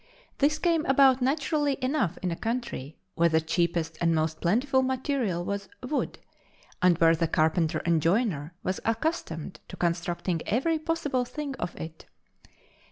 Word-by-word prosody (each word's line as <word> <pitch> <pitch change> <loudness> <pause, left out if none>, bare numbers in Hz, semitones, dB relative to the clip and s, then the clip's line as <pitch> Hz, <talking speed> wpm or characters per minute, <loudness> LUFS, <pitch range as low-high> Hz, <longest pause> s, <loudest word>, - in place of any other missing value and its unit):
This 295 +2 +3
came 330 -1 +2
about 270 -1 +5
naturally 285 +1 +1
enough 255 - 0
in 180 - 0
a - - -1
country 225 - -4 0.2
where 170 0 +3
the 160 0 +3
cheapest 165 0 -1
and 165 -1 +3
most 155 0 -1
plentiful 255 +9 +2
material 260 -8 -1
was 200 +1 -3
wood, 270 +4 -2 0.6
and 180 -2 +5
where 165 0 +5
the 165 +1 0
carpenter 160 +1 +1
and 170 -2 +3
joiner 170 - 0
was 185 - -1
accustomed 225 - -2
to - - -9
constructing 170 0 -1
every 310 +9 +1
possible 305 -5 -1
thing 285 +2 -5
of 175 - -4
it. 160 0 -8
195 Hz, 150 wpm, -27 LUFS, 165-270 Hz, 0.6 s, about